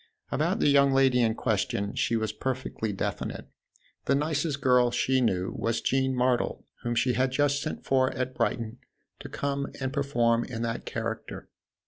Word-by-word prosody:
About - - +1
the - - +3
young 140 -1 +5
lady 135 -2 +4
in 110 -1 +2
question 100 -3 -1
she 115 - 0
was 110 -1 -1
perfectly 130 -3 -3
definite; 95 - -4 0.6
the 140 - +3
nicest 150 0 0
girl 125 -2 +4
she 130 +2 +1
knew 95 -6 0
was 115 0 -1
Jean 130 0 +1
Martle, 125 -1 +1 0.2
whom 120 0 -2
she 125 +2 +2
had 130 +2 +1
just 145 +1 +1
sent 155 - -5
for 130 -1 +3
at 130 0 -2
Brighton 115 -1 -2 0.4
to - - -8
come 140 0 -2
and 130 -1 -3
perform 120 -5 +2
in 115 -2 -5
that 115 0 -3
character. 110 -1 -5
125 Hz, 165 wpm, -28 LUFS, 115-135 Hz, 0.6 s, young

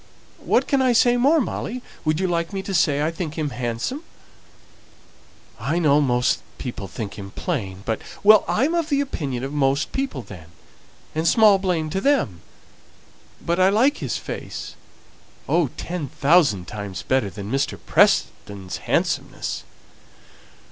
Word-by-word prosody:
What - - +2
can 275 -2 +2
I 255 -2 +3
say 240 +1 +4
more, 280 +7 +4
Molly? 245 -1 -3 0.2
would 155 +1 +1
you 190 - +1
like 170 +2 -1
me 195 -1 -3
to 195 - -5
say 145 -5 +2
I 160 - 0
think 165 -2 -5
him 150 -3 -2
handsome?" 120 - -3 1.6
"I 165 - -1
know 150 -3 +4
most 125 -2 +1 0.2
people 120 -6 -6
think 100 +2 -6
him 100 0 -7
plain, 100 - -4
but 110 -1 -2
" - - -18
"Well, 215 0 +7
I'm 275 +9 +1
of 335 -2 0
the 280 -2 +2
opinion 140 - -3
of 135 +2 -4
most 140 -1 +1
people 265 - -3
then, 90 -6 -11 0.7
and 160 +2 0
small 215 -2 +6
blame 170 -5 -1
to 190 - -1
them. 195 - +1 1.0
But 170 +2 0
I 185 +1 +5
like 245 +8 +3
his - - -2
face - - -7 0.7
oh, 170 -3 +2
ten 175 -4 -4
thousand 140 - +3
times 100 -2 -6
better 130 -6 +1
than 100 +1 -7
Mr. 135 0 0
Preston's 95 -2 +1
handsomeness!" - - -2
155 Hz, 155 wpm, -22 LUFS, 120-200 Hz, 1.6 s, Well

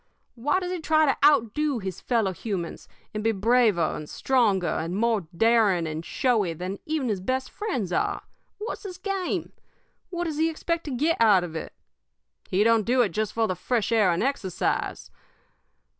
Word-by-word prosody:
Why 290 +10 0
does 360 -1 -4
he 365 - -2
try 315 0 +3
to 275 - +2
outdo 290 0 +3
his 190 -5 -5
fellow 225 -6 +1
humans, 185 -4 -5 0.3
and 215 0 -3
be 225 - +3
braver 220 -4 +2
and 150 0 -7
stronger 220 -9 +2
and 165 +3 -3
more 220 -4 +1
daring 220 -6 +3
and 155 +1 -4
showy 215 -5 +1
than 180 +4 -5
even 305 -4 -1
his 200 -4 -1
best 260 +6 -2
friends 250 - -3
are? - - 0 0.3
What's 425 +3 -5
his 370 -4 -7
game? 385 -1 -3 0.6
What 350 -1 -3
does 315 -4 -3
he 325 +1 +3
expect 335 +1 -3
to 295 - -4
get 295 +3 +1
out 205 -5 +6
of 165 -2 -7
it? 160 - -6 0.8
He 190 +3 +3
don't 230 0 +4
do 245 +3 +3
it 210 - 0
just 215 +4 -2
for 225 -1 +1
the 185 - 0
fresh 235 +3 -1
air 215 -5 +4
and 170 +3 +1
exercise. 245 -9 -2
230 Hz, 180 wpm, -26 LUFS, 190-295 Hz, 0.8 s, out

